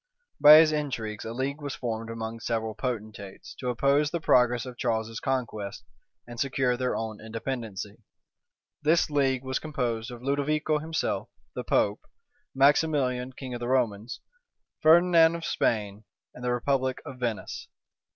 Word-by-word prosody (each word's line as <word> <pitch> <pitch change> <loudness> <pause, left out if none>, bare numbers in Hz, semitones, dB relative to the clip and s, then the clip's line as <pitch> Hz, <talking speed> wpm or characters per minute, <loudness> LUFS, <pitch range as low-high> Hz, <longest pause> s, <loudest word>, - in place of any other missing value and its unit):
By 150 +1 +10
his 155 0 +7
intrigues, 125 -8 -3
a 110 - -4
league 135 +5 -3
was 145 -2 -4
formed 115 -2 -4
among 115 0 -5
several 115 -1 -2
potentates, 105 -5 -6
to 125 - -2
oppose 140 +4 +2
the 170 - -2
progress 125 -5 +3
of 125 -1 -8
Charles's 115 -1 -2
conquests, 115 -6 -3 0.4
and 120 -1 -10
secure 130 -2 +1
their 125 0 -1
own 110 -2 -4
independency. 110 -3 -5 0.8
This 155 +1 +2
league 135 -3 +1
was 130 0 -2
composed 125 -6 -3
of 120 -1 -10
Ludovico 150 +3 0
himself, 160 +1 -2 0.2
the - - -4
pope, - - +1 0.5
Maximilian, 135 -3 +2
king 130 -1 -7
of 120 - -4
the 120 - -4
Romans, 120 -3 -1 0.6
Ferdinand 165 0 +6
of 170 - -5
Spain, 105 -2 -1 0.3
and 125 - -11
the 125 - 0
republic 130 +1 0
of 130 - -9
Venice. 120 -4 -4
125 Hz, 145 wpm, -27 LUFS, 115-140 Hz, 0.8 s, By